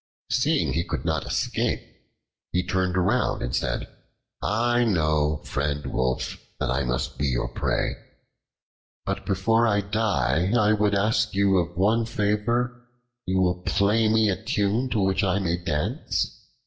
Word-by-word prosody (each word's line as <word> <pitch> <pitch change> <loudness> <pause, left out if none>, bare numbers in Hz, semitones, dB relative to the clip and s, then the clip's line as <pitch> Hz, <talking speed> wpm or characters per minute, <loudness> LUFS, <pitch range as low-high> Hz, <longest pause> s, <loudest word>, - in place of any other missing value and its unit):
Seeing - - +2
he 85 - 0
could - - -4
not - - -1
escape, - - -1 0.7
he 90 +1 0
turned 95 0 0
round, 100 +8 +1
and - - -2
said: - - -1 0.5
"I 120 +3 +2
know, 75 -7 +1
friend 75 +1 -2
Wolf, 65 0 -1 0.2
that - - -1
I 65 +2 0
must 65 +4 -2
be 70 - +1
your 60 -2 0
prey, - - -1 1.1
but - - -3
before 115 +5 +2
I 100 -2 +2
die 95 - 0
I 105 -2 +4
would 105 -1 +2
ask 110 +2 +2
of 105 - -13
you 95 -3 +3
one 110 +5 +2
favor 115 +3 0 0.4
you 95 0 +2
will 90 -1 +1
play 105 +4 +2
me 110 -1 +3
a 95 - -4
tune 105 +6 0
to 115 - 0
which 95 +1 +1
I 95 0 +2
may 90 -3 0
dance." 85 - -2
100 Hz, 150 wpm, -25 LUFS, 85-110 Hz, 1.1 s, I